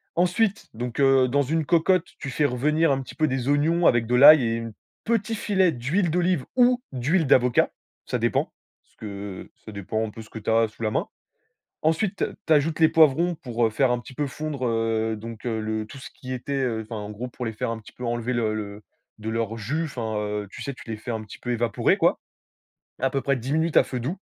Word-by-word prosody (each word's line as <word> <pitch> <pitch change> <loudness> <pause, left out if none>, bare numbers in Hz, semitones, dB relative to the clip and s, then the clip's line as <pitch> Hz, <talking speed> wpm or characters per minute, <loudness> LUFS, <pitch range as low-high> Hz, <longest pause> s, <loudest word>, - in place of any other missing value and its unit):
Ensuite, 185 +5 +1
donc 120 +2 -5
heu, 135 -1 +5
dans 140 +3 +2
une 155 +3 0
cocotte, 175 +2 +3
tu 135 - -5
fais 150 +3 +1
revenir 150 +5 +2
un 135 0 +1
petit 130 - -10
peu 155 - +2
des 130 -1 -2
oignons 160 +4 +3
avec 120 -1 +3
de 125 - +1
l'ail 145 +2 +9
et 115 -1 0
une 115 -1 -5 0.3
petit 225 -1 0
filet 190 -4 +2
d'huile 155 +9 0
d'olive 175 -4 +1
ou 250 0 +4
d'huile 150 +7 +1
d'avocat, 125 -2 +4 0.3
ça - - -1
dépend, - - 0 0.3
ce - - -34
que 100 -2 -7 0.2
ça 110 - -8
dépend 110 +2 -3
un 110 - -7
peu 115 - -9
de - - -11
ce - - -19
que - - -9
tu 105 - -4
as 115 0 +4
sous 115 - -10
la 110 - 0
main. - - -1 0.7
Ensuite, 170 +5 +1
tu - - +1 0.2
tu 160 - +5
ajoutes 155 +2 +2
les 160 - +7
poivrons 165 +2 +4
pour, 120 -5 -1
heu, - - -2
faire 130 +3 +2
un 125 - 0
petit 120 - -12
peu 145 +2 -2
fondre, 145 -1 -4
heu, 115 -1 0
donc 115 +1 -9
heu, 115 -2 -1
le 110 0 -2
tout 140 - -11
ce 135 - -9
qui 130 - -9
était, 130 +2 -4
heu, 115 -3 -1
enfin 110 +1 -8
en 105 - -7
gros 110 +4 -6
pour 125 0 -6
les 115 - -3
faire 110 - -2
un 115 - -4
petit 110 - -15
peu 125 - -8
enlever 120 +1 -1
le 115 -3 0
le 105 -1 -6 0.4
de 110 +1 -5
leur 115 0 -2
jus. 145 +10 -2
Enfin, 115 -7 -4
heu, 105 0 -3
tu - - -9
sais, 140 - -4
tu - - -13
les 110 - -3
fais 120 +3 -6
un 110 -1 -3
petit 105 - -11
peu 125 - -4
évaporer, 120 -2 +1
quoi, - - +2 0.8
à 135 - +1
peu 135 - -1
près 140 0 +1
10 130 +3 -4
minutes 160 +1 +1
à - - +7
feu 125 -2 -4
doux. 145 +10 -3
125 Hz, 245 wpm, -25 LUFS, 115-155 Hz, 0.8 s, l'ail